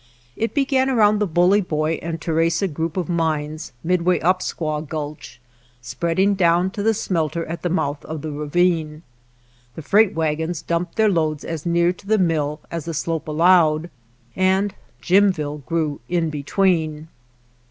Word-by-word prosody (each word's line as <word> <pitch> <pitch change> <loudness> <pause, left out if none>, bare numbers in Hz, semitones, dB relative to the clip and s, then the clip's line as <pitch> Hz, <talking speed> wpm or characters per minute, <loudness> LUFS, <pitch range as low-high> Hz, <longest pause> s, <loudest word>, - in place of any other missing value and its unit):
It 225 +5 -2
began 270 -2 +2
around 215 -4 +3
the 210 - +1
Bully 180 +4 +3
Boy 155 -2 -1
and 165 0 -4
Theresa 165 +3 +1
group 160 +1 -4
of 180 - -1
mines 155 -2 -2
midway 180 +1 +2
up 185 +2 +2
Squaw 155 -4 -3
Gulch, 150 -4 -7 0.4
spreading 170 +10 0
down 175 0 +2
to 205 - -5
the 220 +1 +2
smelter 165 -3 -1
at 170 +2 -6
the 175 - -1
mouth 145 -5 -1
of 155 -1 -6
the 155 - -4
ravine. 155 +1 0 0.7
The 160 - -8
freight 205 +4 +3
wagons 160 +1 -1
dumped 170 +1 -2
their 220 -1 +3
loads 155 -4 0
as 165 0 -5
near 170 +1 +2
to 190 - -18
the 220 +1 +3
mill 155 -5 0
as 165 -3 -4
the 165 -1 -4
slope 165 +1 -2
allowed, 165 0 +3 0.4
and 190 +2 +2 0.3
Jimville 175 -6 +2
grew 155 -2 -1
in 170 -3 0
between. 155 0 0
165 Hz, 155 wpm, -21 LUFS, 155-185 Hz, 0.7 s, around